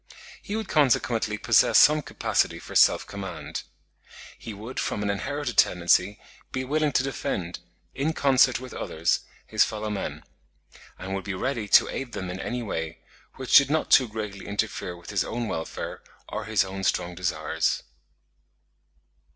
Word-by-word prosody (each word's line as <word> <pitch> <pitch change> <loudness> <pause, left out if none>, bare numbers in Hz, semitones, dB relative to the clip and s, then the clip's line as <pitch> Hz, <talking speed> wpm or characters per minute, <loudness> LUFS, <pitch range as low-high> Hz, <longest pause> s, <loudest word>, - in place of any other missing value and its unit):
He 205 - -5
would 220 -2 -3
consequently 120 -7 +2
possess - - +4
some 150 +1 +6
capacity - - 0
for - - -10
self - - +5
command. 100 -1 -6 0.8
He 115 - -7
would 110 +5 -7
from 105 - -2
an 100 - +1
inherited 140 +5 -3
tendency 90 +3 +3 0.3
be 130 - -2
willing 150 +3 +1
to 125 - +3
defend, 95 -9 -3 0.3
in 145 +4 -1
concert 130 -4 +4
with 130 0 -9
others, 80 +1 0 0.3
his - - +3
fellow 110 -1 -3
men; 100 - -4 0.7
and 95 +1 -6
would 95 -1 -3
be 100 -2 -4
ready 120 +1 -2
to - - +6
aid 130 -3 -5
them 95 -1 -4
in 90 - -6
any 125 +3 -3
way, 80 -6 -4 0.3
which 130 -2 0
did 140 -1 +8
not 155 +1 0
too 130 - +7
greatly 105 -3 -6
interfere 100 -4 -3
with 85 +3 -10
his 100 - +1
own 120 0 -3
welfare 80 -5 -5 0.3
or - - -5
his 110 -3 +2
own 95 0 -6
strong 90 -1 0
desires. 80 -2 -1
105 Hz, 160 wpm, -26 LUFS, 95-130 Hz, 0.8 s, did